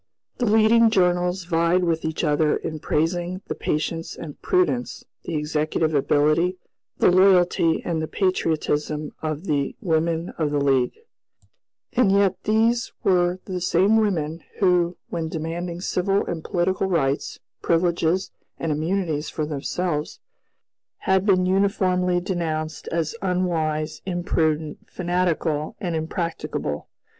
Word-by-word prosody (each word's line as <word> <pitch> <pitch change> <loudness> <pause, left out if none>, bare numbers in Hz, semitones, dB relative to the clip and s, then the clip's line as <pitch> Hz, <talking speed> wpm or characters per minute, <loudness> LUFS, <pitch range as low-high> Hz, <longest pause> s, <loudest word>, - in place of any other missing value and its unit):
The 245 - +1
leading 225 +2 +5
journals 180 -2 +1
vied 170 +1 +2
with 165 -2 0
each 160 0 -2
other 150 +1 +2
in 155 -1 -5
praising 175 +5 -1
the - - -3
patience 165 +2 -2
and 150 -4 -9
prudence, 360 -10 0 0.2
the 165 - -3
executive 155 +1 0
ability, 155 +5 +2 0.4
the - - +4
loyalty, 180 -3 +4
and 165 -2 -1
the 155 - -2
patriotism 155 -5 -1
of 155 0 -3
the 145 -4 -1
women 165 -3 0
of 155 -2 +1
the 145 - 0
League, 135 -3 +1 1.0
and 245 -6 +3
yet 195 -1 +3
these 225 +2 +2
were 180 -1 +2
the 185 -2 -4
same 185 +5 +3
women 165 -7 0
who, 180 -2 +2
when 165 -2 -3
demanding 170 +2 -4
civil 195 +2 0
and 165 -2 -4
political 185 +1 0
rights, 140 -6 0 0.2
privileges, 170 +1 +1 0.3
and 165 - -2
immunities 160 0 -1
for 155 - -2
themselves, 150 +2 -3 0.8
had 190 +1 +2
been 185 -2 +4
uniformly 185 -2 +2
denounced 160 -4 -3
as 165 -2 -1
"unwise," 165 -5 -1
"imprudent," 160 -4 0
"fanatical," 175 -4 -1
and 175 -6 -2
"impracticable." 160 - -3
170 Hz, 125 wpm, -23 LUFS, 155-185 Hz, 1.0 s, leading